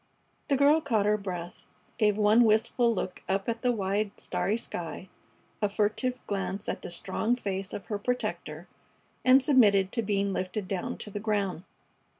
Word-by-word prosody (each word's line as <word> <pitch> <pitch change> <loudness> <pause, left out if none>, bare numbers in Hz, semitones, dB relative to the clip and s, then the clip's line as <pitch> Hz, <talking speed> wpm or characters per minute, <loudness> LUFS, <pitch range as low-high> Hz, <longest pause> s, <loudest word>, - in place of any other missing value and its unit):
The 280 - +2
girl 290 +3 +5
caught 225 -8 +1
her 210 0 +3
breath, 180 -4 -6 0.3
gave 210 -2 +3
one 215 +3 +5
wistful 230 +2 +3
look 190 -4 -3
up 195 0 0
at 230 -1 -2
the 250 - +2
wide, 205 -1 0
starry 210 +3 -1
sky, 180 -3 -6 0.5
a 210 - +2
furtive 220 +5 -1
glance 200 0 -3
at - - -3
the - - -7
strong 195 +7 -1
face 195 -5 -4
of 195 - -6
her 205 +3 -3
protector, 250 +4 -3 0.6
and 260 +1 +6
submitted 205 -9 +4
to 235 - 0
being 200 -2 0
lifted 185 +2 -3
down 185 -2 -3
to 210 - -7
the 205 - -4
ground. 200 -4 -1
210 Hz, 165 wpm, -28 LUFS, 195-230 Hz, 0.6 s, and